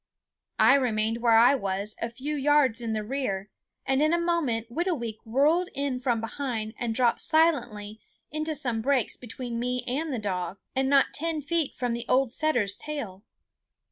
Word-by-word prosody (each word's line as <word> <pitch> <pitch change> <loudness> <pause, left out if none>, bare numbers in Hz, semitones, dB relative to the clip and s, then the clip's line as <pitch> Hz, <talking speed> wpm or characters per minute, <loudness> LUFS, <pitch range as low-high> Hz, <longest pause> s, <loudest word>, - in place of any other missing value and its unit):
I - - +6
remained 225 -4 +1
where 230 -2 +5
I 240 +4 +7
was, 200 -3 -2
a 230 - -1
few 270 +6 -4
yards 280 -4 +3
in 230 -2 -2
the 215 -1 -2
rear, 210 -5 -3 0.3
and 270 +1 +1
in 310 +2 +3
a - - 0
moment 290 -10 0
Whitooweek 255 - -2
whirled 300 +10 +2
in 275 -2 -2
from 240 -2 0
behind 225 -2 -4
and 230 -2 -2
dropped 240 -1 +2
silently 240 -10 +1 0.3
into 310 +1 -2
some 245 -6 -2
brakes 265 -1 +1
between 240 0 -6
me 250 +1 -2
and 280 +6 -2
the 255 - -2
dog 185 -3 -3 0.2
and 265 0 +1
not 275 -1 +4
ten 320 -1 -2
feet 325 0 -1
from 245 -2 -2
the 235 0 -4
old 260 -1 +3
setter's 245 -10 +2
tail. 225 -11 -6
250 Hz, 170 wpm, -27 LUFS, 225-290 Hz, 0.3 s, I